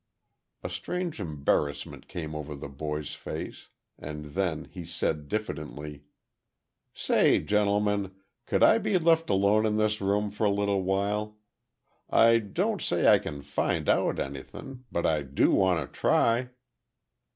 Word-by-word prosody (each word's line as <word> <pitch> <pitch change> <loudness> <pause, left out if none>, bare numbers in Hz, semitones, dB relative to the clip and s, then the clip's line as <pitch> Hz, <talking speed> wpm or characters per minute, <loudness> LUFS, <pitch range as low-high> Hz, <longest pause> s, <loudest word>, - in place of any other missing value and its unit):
A - - -3
strange 170 - -4
embarrassment 70 -4 -2
came 80 -3 -6
over 75 -1 -5
the 70 +1 -7
boy's 75 +1 -4
face, - - -7 0.3
and 75 -1 -7
then 90 -5 -1
he - - -9
said, 75 -2 -2
diffidently: 75 -6 -5 0.9
"Say, - - +3
gentlemen, 105 -1 +1 0.4
could - - +2
I 225 - +6
be 200 - +1
left 165 -1 +3
alone 100 +2 +3
in 105 -1 +1
this 110 -1 +1
room 100 +1 +1
for 105 +1 -1
a - - +4
little 100 -1 +1
while? 100 +3 -1 0.7
I 115 0 +6
don't 105 -3 -1
say - - +1
I - - +7
kin 70 -1 -7
find 70 0 -1
out - - +2
anythin'—but 85 - -5
I 80 -2 +2
do 70 0 +2
wanta 95 -3 +2
try." 120 +2 +1
95 Hz, 135 wpm, -28 LUFS, 75-105 Hz, 0.9 s, I